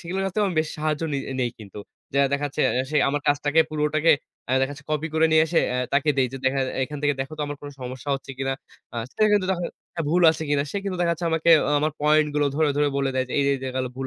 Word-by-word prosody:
সেগুলোর 185 +3 -3
কাছ 195 - -1
থেকেও 210 -1 +2
আমি 180 - -5
বেশ 155 - -3
সাহায্য 155 -1 -1
নে 140 - 0 0.2
নেই 120 -1 0
কিন্তু। 105 -1 -10 0.3
যে 140 - +1
দেখা 140 +1 0
যাচ্ছে 145 - -4 0.3
সে 150 - 0
আমার 145 +1 -1
কাজটাকে 145 +2 +3
পুরোটাকে 155 +1 +2 0.4
আ - - +1
দেখা 135 +1 0
যাচ্ছে 140 0 -12
কপি 155 +1 -1
করে 160 0 +4
নিয়ে 160 0 +5
এসে 165 +1 +1
অ্যা 125 - -1
তাকে 140 +2 +2
দেই 130 -2 +2
যে 135 - -5
দেখা 135 +1 +2 0.2
এখান 150 +2 -7
থেকে 145 -1 +2
দেখো 135 +3 -4
তো - - -1
আমার 145 0 -5
কোন 145 - -8
সমস্যা 130 +2 -7
হচ্ছে 135 0 -7
কিনা? 135 0 -1 0.4
আ - - -5 0.2
সে - - 0
কিন্তু 205 -3 +3
তখন 175 -2 -2 0.4
ভুল 175 +3 +2
আছে 160 - -4
কিনা। 145 -1 +2
সে - - -4
কিন্তু 195 -2 -2
দেখা 170 -1 +2
যাচ্ছে 170 +1 -3
আমাকে 160 +1 +2 0.3
আমার 155 +1 0
পয়েন্ট 150 0 +4
গুলো 145 -1 +2
ধরে, 155 0 +2
ধরে, 145 0 +3
বলে 135 -1 0
দেয় 130 0 +1
যে - - -7
এই - - +3
যে - - +3
এই - - -11
জায়গায় 130 0 -2
ভুল 130 0 -3
145 Hz, 265 wpm, -24 LUFS, 135-160 Hz, 0.4 s, নিয়ে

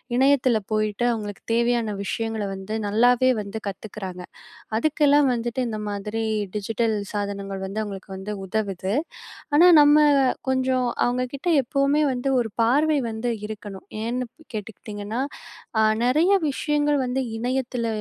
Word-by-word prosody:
இணையத்தில 260 -2 +4 0.2
போயிட்டு, 215 +1 0
அவுங்களுக்கு 210 -3 -6
தேவையான 235 -1 +1
விஷயங்கள 225 +1 -2
வந்து 195 +3 -6
நல்லாவே 245 +4 +4
வந்து 200 +1 -6
கத்துக்கிறாங்க. 195 -2 -6 0.5
அதுக்கெல்லாம் 290 +2 +3
வந்துட்டு 240 +1 -3
இந்த 220 - -3
மாதிரி 210 +2 -3 0.3
டிஜிட்டல் 220 +2 0 0.2
சாதனங்கள் 200 -1 -4
வந்து 200 +3 -4
அவுங்களுக்கு 195 -2 -7
வந்து 190 +2 -6
உதவுது. 195 -1 -2 0.6
ஆனா, 340 +5 +7
நம்ம 290 +1 +6 0.5
கொஞ்சம் 260 -1 +1 0.2
அவுங்க 250 +1 +1
கிட்ட 280 +6 -6 0.2
எப்பவுமே 275 +4 +1
வந்து 255 +1 -2
ஒரு 230 -2 -1
பார்வை 290 +7 +3
வந்து 225 +2 -3 0.2
இருக்கணும். 205 -2 -8 0.2
ஏன்னு 245 +2 -1
ப் 315 - -22
கேட்டுக்கிட்டீங்கன்னா, 210 +1 -5 0.6
அ - - +5 0.2
நிறைய 290 +8 +3 0.2
விஷயங்கள் 295 +1 +1
வந்து 250 +2 -1 0.2
இணையத்தில 245 -1 -2
230 Hz, 125 wpm, -24 LUFS, 210-260 Hz, 0.6 s, ஆனா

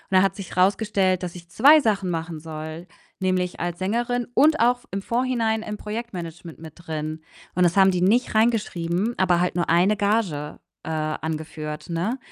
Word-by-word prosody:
dann 185 - +6
hat 195 - +1
sich 190 -3 -8
rausgestellt, 190 -1 +2
dass 175 0 -5
ich 170 -1 -12
2 295 - +6
Sachen 200 -5 0
machen 165 -1 -4
soll, 160 +2 -7 0.3
nämlich 185 -1 -1
als 175 0 -3
Sängerin 240 +5 -1
und 310 +5 +4
auch 245 +1 +3
V - - -25
im 195 +1 -3
Vorhinein 235 -2 0
im 210 - -5
Projektmanagement 180 -8 -7
mit 160 -2 -10
drin. 155 -2 -5 0.4
Und 180 - +3
das 175 0 +3
haben 190 0 +6
die 180 -1 -1
nicht 230 +7 +2
reingeschrieben, 210 -2 +1
aber 180 -2 +3
halt 180 - 0
nur 175 - 0
1 180 +5 +3
Gage, 200 -8 -1 0.2
äh, - - -6
angeführt, 155 0 -4
ne? 180 +10 -1
185 Hz, 175 wpm, -24 LUFS, 165-220 Hz, 0.4 s, dann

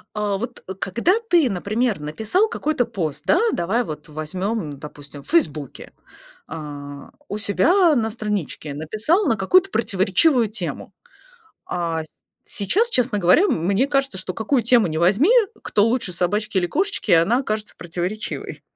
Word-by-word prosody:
А 205 -2 -1
вот 240 +5 -6 0.2
когда 235 - +1 0.2
ты, 330 -8 +4
например, 210 +2 -1
написал 220 - 0
какой-то 305 - -1
пост, 175 -11 -4
да, - - +4
давай 210 +8 0
вот 155 -4 -8
возьмем, 155 +1 -4
допустим, 145 0 -10
в - - -17
"Фейсбуке". 155 - -1 0.5
А, 145 -3 -8 0.2
у 205 - -3
себя 310 - +3
на 225 -3 0
страничке 205 -9 -4
написал 215 - 0
на 225 - +2
какую-то 370 - +3
противоречивую 220 - +2
тему. 220 - -5 0.7
А 165 -2 -2
с 155 - -20 0.2
сейчас, 415 - +1
честно 245 - +2
говоря, 200 - +4
мне 200 - +1
кажется, 275 -8 0
что 185 -1 -4
какую 240 +3 +1
тему 235 -1 +4
ни 155 -2 -2
возьми, 200 - +3 0.3
кто 205 - +2
лучше, 230 -5 0
собачки 195 +4 -1
или 175 -1 +1
кошечки, 380 - -1
она 175 +9 +4
окажется 215 -5 -3
противоречивой. 180 +5 -5
205 Hz, 145 wpm, -21 LUFS, 170-245 Hz, 0.7 s, ты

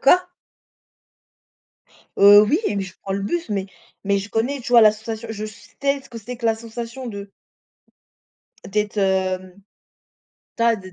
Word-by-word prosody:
quoi? 360 +6 +5 1.9
Heu, 205 +1 +9
oui, 285 - +2
mais 200 -1 -1
je 190 -1 -10
prends 195 - -5
le 195 - -2
bus 330 - -2
mais 195 -2 -1 0.4
mais 200 0 +2
je 200 - -7
connais, 250 +6 -1
tu 245 - -7
vois, 240 - +8
la 215 - +8
sensation. 220 +1 -7
Je 215 0 -5
sais 275 +6 -3
ce - - -18
que 235 - -8
c'est 240 +3 -8
que 235 - -5
la 225 -1 +3
sensation 230 +3 -7
de 200 -3 -7 1.4
d'être, 210 +1 -2
hem, 190 -1 -1 1.0
d'a 230 -1 +3
d'êt 185 -2 -11
215 Hz, 160 wpm, -22 LUFS, 200-235 Hz, 1.9 s, Heu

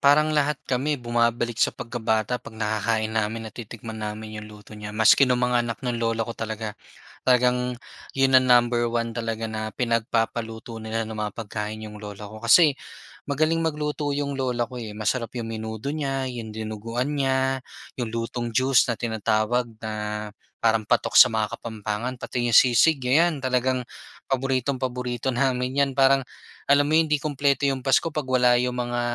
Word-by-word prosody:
parang 150 +2 +4
lahat 150 -1 +2
kami 140 +3 0
bumabalik 120 -1 0
sa - - +5
pagkabata 115 0 -2
'pag 110 - -12
nakakain 110 +1 -1
namin, 110 +1 -1
natitikman 110 0 -8
namin 110 0 -5
yung 105 - -10
luto 105 0 -14
niya. 105 0 -7
Maski 130 +4 +6
nung 125 0 +2
mga 125 -1 +2
anak 120 -1 -3
ng 120 -1 -2
lolo 115 -1 0
ko 115 - -5
talaga. 110 -1 -5 0.6
Talagang 125 0 +3 0.4
'yon 135 0 +3
ang 130 0 +6
number 120 -1 +4
1 115 0 -1
talaga 115 -1 -3
na 110 -1 -3
pinagpapaluto 115 0 -2
nila 110 +1 -2
ng 110 - -7
mga 105 -1 -2
pagkain 110 -1 -5
yung 105 -1 -9
lola 105 0 -8
ko 110 +1 -10
kasi, 150 +6 +6 0.6
magaling 155 +3 +1
magluto 150 -2 -2
'yung 140 -1 -2
lola 125 -3 -1
ko, 125 +1 -8
eh. 105 -2 -7
Masarap 115 +2 -1
yung 115 -1 -4
menudo 110 +4 -4
niya, 135 -3 -2
yung 115 -4 -6
dinuguan 115 +5 -3
niya, 130 0 +1 0.4
yung 120 - -2
lutong 115 +1 -3
juice 130 +2 +3
na 120 - 0
tinatawag 110 +1 0
na 110 -1 -5 0.7
parang 110 -2 +2
patok 120 +1 +1
sa - - +11
mga 110 -3 -2
Kapampangan, 110 +2 -4
pati 120 0 -2
yung 115 - +1
sisig. 130 +5 +5
Ayan, 150 +3 +2
talagang 130 0 +1 0.5
paboritong 135 0 0
paborito 125 -1 -3
namin 130 0 0
'yan. 140 -1 +3
Parang, 135 0 +5 0.5
alam 145 0 +5
mo 155 - +1
hindi 155 -2 +3
kumpleto 140 -1 +1
yung 135 -1 -1
pasko 135 +5 +3
'pag 150 - 0
wala 125 -1 +4
yung 125 0 -2
mga 120 0 -1
120 Hz, 170 wpm, -24 LUFS, 110-130 Hz, 0.7 s, sa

